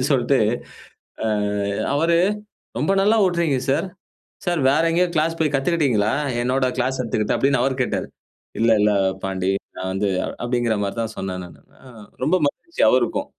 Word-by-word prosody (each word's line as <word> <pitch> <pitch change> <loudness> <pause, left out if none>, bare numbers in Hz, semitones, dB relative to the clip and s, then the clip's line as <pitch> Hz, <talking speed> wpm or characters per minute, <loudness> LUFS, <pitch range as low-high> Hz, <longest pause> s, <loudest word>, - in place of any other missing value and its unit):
அப்டின்னு 130 - 0
சொல்ட்டு 130 +1 +2 0.9
ஆ - - 0 0.7
அவரு, 165 +3 +2 0.6
ரொம்ப 155 +8 +1
நல்லா 215 +3 +4
ஓட்றீங்க 170 -6 +1
சார், 155 +7 +1 0.6
சார் 175 -3 +1
வேற 150 - +3
எங்கேயோ 180 +1 +2
கிளாஸ் 165 +2 +1
போய் 150 -3 +1
கத்துகிட்டிங்களா? 135 -9 +1 0.3
என்னோட 130 +1 +1
கிளாஸ் 130 +1 0
எடுத்துக்கிட்டு 110 -3 -1
அப்டின்னு 135 -2 +2
அவர் 130 0 -1
கேட்டாரு. - - -2 0.5
"இல்ல, 115 0 +3
இல்ல 105 0 +4 0.3
பாண்டி. 95 0 -1 0.3
நான் 95 - -3
வந்து 100 +1 0 0.3
அப்டிங்கிற 120 -2 0
மாரி 100 +2 -4
தான் 110 -1 -5
சொன்னேன்" 90 -1 -4
நானு. 85 - -16 0.2
ஆ 135 - -18 0.4
ரொம்ப 175 +6 +3
மகிழ்ச்சி! 340 - -5
அவருக்கும். - - +1
135 Hz, 150 wpm, -22 LUFS, 110-160 Hz, 0.9 s, நல்லா